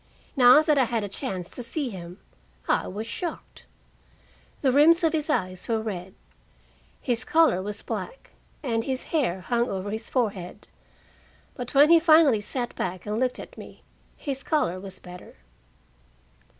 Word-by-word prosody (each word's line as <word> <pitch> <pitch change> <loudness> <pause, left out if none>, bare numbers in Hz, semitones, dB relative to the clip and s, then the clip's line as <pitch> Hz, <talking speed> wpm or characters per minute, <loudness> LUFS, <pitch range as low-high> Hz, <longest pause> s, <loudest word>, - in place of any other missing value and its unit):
Now 255 +3 +7
that 305 -3 +3
I 260 - +4
had 230 -2 -2
a - - -3
chance 185 -2 -4
to - - -7
see 265 +3 -3
him, 175 -2 -9 0.5
I - - +1
was 210 +4 -5
shocked. 340 +9 -6 0.9
The 265 - +3
rims 320 +6 +5
of 325 -1 +3
his 315 -1 -1
eyes 185 -10 -1
were 225 -1 +1
red, 190 -4 -6 0.8
his 245 -1 -1
collar 310 - +3
was 205 +1 -6
black, - - -6 0.3
and 230 -4 0
his 260 0 -3
hair 235 - +1
hung 240 +5 0
over 195 +1 -4
his 220 +1 -5
forehead. 205 -6 -3 0.9
But 245 +1 -7
when 290 +3 +7
he 335 - +8
finally 310 -8 +5
sat 240 +3 -4
back 185 0 -4
and 210 +1 -2
looked 255 -1 0
at - - -10
me, - - -12 0.3
his 275 -3 -4
color 230 - 0
was 190 0 -9
better. 180 0 -12
235 Hz, 160 wpm, -26 LUFS, 195-290 Hz, 0.9 s, he